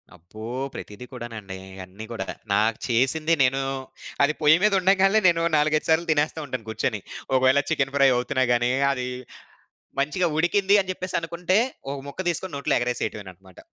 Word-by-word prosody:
అబ్బో! 100 Hz, +6 st, -13 dB, 0.3 s
ప్రతిది 105 Hz, +4 st, -9 dB
కూడానండి. 110 Hz, -5 st, -7 dB, 0.3 s
అన్ని 95 Hz, +4 st, -10 dB
గూడా 110 Hz, -5 st, -4 dB, 0.3 s
నాకు 110 Hz, +2 st, +2 dB
చేసింది 135 Hz, +7 st, +2 dB
నేను 130 Hz, +1 st, +2 dB, 0.6 s
అది 145 Hz, +2 st, +3 dB
పొయ్యి 150 Hz, +1 st, +6 dB
మీద 210 Hz, -1 st, +4 dB
ఉండగాల్నే 195 Hz, +3 st, +4 dB
నేను 170 Hz, -1 st, +3 dB, 0.2 s
నాలుగైదు 155 Hz, +1 st, +1 dB
సార్లు 160 Hz, +2 st, +3 dB
తినేస్తా 155 Hz, +1 st, 0 dB
ఉంటాను 130 Hz, -5 st, -5 dB
కూర్చొని. 110 Hz, -1 st, -2 dB, 0.3 s
ఒకవేళ 130 Hz, +1 st, +4 dB
చికెన్ 135 Hz, -4 st, 0 dB
ఫ్రై 140 Hz, -1 st, +5 dB
అవుతున్నా 130 Hz, +2 st, 0 dB
గాని 120 Hz, +1 st, +1 dB, 0.2 s
అది 125 Hz, -2 st, -3 dB, 0.9 s
మంచిగా 150 Hz, +6 st, +1 dB
ఉడికింది 190 Hz, +5 st, +2 dB
అని 190 Hz, -1 st, -4 dB
చెప్పేసనుకుంటే 180 Hz, 0 st, -1 dB, 0.3 s
ఒక 140 Hz, -, -3 dB
ముక్క 140 Hz, -, -5 dB
తీసుకొని 175 Hz, +2 st, -2 dB
నోట్లో 140 Hz, -, 0 dB
ఎగరేసేయటమేనన్నమాట. 95 Hz, -6 st, -5 dB
140 Hz, 145 wpm, -24 LUFS, 115-165 Hz, 0.9 s, పొయ్యి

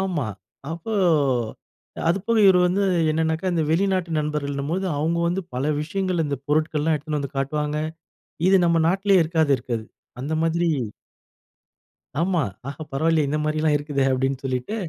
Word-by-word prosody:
ஆமா. 175 Hz, -10 st, -1 dB, 0.4 s
அப்போ 170 Hz, +7 st, -5 dB, 1.2 s
அதுபோக 205 Hz, +6 st, +1 dB
இவரு 185 Hz, -2 st, +6 dB
வந்து 190 Hz, +3 st, +1 dB, 0.3 s
என்னனாக்க 160 Hz, +3 st, 0 dB
இந்த 165 Hz, -2 st, +1 dB
வெளிநாட்டு 185 Hz, 0 st, +1 dB
நண்பர்கள் 150 Hz, -1 st, -2 dB
என்னும்போது 165 Hz, +8 st, -2 dB
அவங்க 165 Hz, +3 st, 0 dB
வந்து 180 Hz, +3 st, 0 dB
பல 130 Hz, +2 st, -1 dB, 0.2 s
விஷயங்கள் 185 Hz, +2 st, -1 dB
இந்த 145 Hz, -1 st, -2 dB
பொருட்கள் 155 Hz, 0 st, +1 dB
எல்லாம் 160 Hz, +1 st, +2 dB
எடுத்துட்டு 150 Hz, +1 st, -3 dB
வந்து 140 Hz, 0 st, -6 dB
காட்டுவாங்க. 150 Hz, +2 st, -1 dB, 0.7 s
இது 195 Hz, -, +6 dB
நம்ப 170 Hz, -1 st, +3 dB
நாட்டுலேயே 195 Hz, 0 st, +3 dB
இருக்காது, 160 Hz, -3 st, +1 dB
இருக்காது. 115 Hz, -3 st, -4 dB, 0.4 s
அந்த 150 Hz, +4 st, -3 dB
மாதிரி 170 Hz, +1 st, +1 dB, 1.5 s
ஆமா, 175 Hz, -2 st, +1 dB, 0.3 s
ஆஹா 140 Hz, +3 st, -6 dB
பரவாயில்லயே 155 Hz, +1 st, +2 dB
இந்த 150 Hz, +2 st, 0 dB
மாதிரிலாம் 155 Hz, 0 st, +1 dB
இருக்குதே 145 Hz, -2 st, -1 dB
னு, 135 Hz, -, +2 dB
அப்டீன்னு 135 Hz, +1 st, -1 dB
சொல்லிட்டு 130 Hz, -, -2 dB
160 Hz, 145 wpm, -23 LUFS, 145-175 Hz, 1.5 s, இவரு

